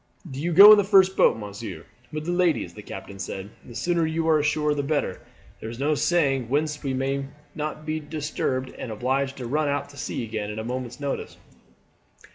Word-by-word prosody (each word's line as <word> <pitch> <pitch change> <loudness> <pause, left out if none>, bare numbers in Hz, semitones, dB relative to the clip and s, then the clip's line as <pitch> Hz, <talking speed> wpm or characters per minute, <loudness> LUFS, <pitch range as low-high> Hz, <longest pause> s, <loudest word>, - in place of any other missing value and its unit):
"Do 135 +1 -5
you 175 +2 -1
go 200 +5 +11
in 210 - +9
the - - +3
first 190 -1 +5
boat, - - +4
monsieur, 100 -5 -7 0.3
with 155 0 -5
the 175 - -1
ladies," 175 - +1
the 105 - -10
captain 100 -1 -9
said. 95 +2 -6
"The 120 - -12
sooner 170 +7 +1
you 160 +1 -1
are 155 -1 +5
ashore 150 0 +1
the 145 - -1
better. 145 +1 -1 0.4
There 110 - -6
is 115 - -8
no 145 +4 +1
saying 140 -6 +1
whether 150 +4 +2 0.2
we 135 -2 -1
may 135 +1 -1 0.3
not 155 0 -5
be 155 0 -2
disturbed 145 -4 -3
and 115 - -5
obliged 130 +5 -1
to 125 - -6
run 150 +5 0
out 140 0 -1
to 140 - -15
sea 125 - -3
again 110 -2 -4
at 105 - -6
a 110 - -3
moment's 125 +1 -5
notice." 140 -1 -4
140 Hz, 210 wpm, -25 LUFS, 120-155 Hz, 0.4 s, go